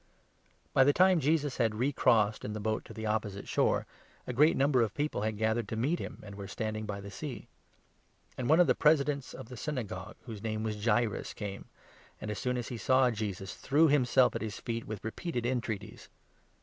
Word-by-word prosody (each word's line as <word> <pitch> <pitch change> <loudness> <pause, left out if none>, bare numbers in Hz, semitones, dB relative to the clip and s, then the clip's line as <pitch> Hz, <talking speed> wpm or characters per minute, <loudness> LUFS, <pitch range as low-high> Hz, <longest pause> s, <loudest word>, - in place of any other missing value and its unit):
By 135 - +6
the 145 +2 +4
time 185 +1 +5
Jesus 150 -1 +1
had 115 -3 +1
re 130 +6 0
crossed 110 -4 +3
in 105 - -4
the 105 - -4
boat 110 +1 -2
to - - -11
21 - - -8
ofRthe'ne - - -16
the 110 -1 -1
opposite 100 -2 -4
shore, - - +2 0.4
a 125 - -4
great 150 +6 +4
number 135 -2 +3
of 110 -3 0
people 150 -6 -1
had 110 +1 0
Daughter - - -9
of - - -10
gathered 115 +1 -1
to - - -4
meet 140 +10 0
him, - - -7
and 100 - -9
were 100 -1 -7
standing 110 +1 -4
by 100 -1 -4
the 100 - -8
jaeirus. 135 +6 -6
gea - - -22 0.9
^nd 125 - -1
one 160 +3 +5
of 180 - +7
tne 130 - +4
Presidents 145 -3 +2
of 130 - -8
the 125 - -8
22 - - -11
Synagogue, 110 -11 -4
whose 110 -5 -8
name 110 -1 -2
was 110 -1 -2
Jaeirus, 115 -1 +1
came 100 -2 -6 0.5
and, 105 - -4
as 105 - -4
soon 125 0 -1
as 120 - -4
he 120 - -4
saw 130 +1 +3
Jesus, 100 -4 -4
threw 150 +4 +3
himself 130 -3 +4
at - - -2
his 110 -1 -4
feet 115 -1 -4
with 105 -1 -6
repeated 120 +1 -3
entreaties. 120 -4 -3
115 Hz, 230 wpm, -31 LUFS, 105-135 Hz, 0.9 s, of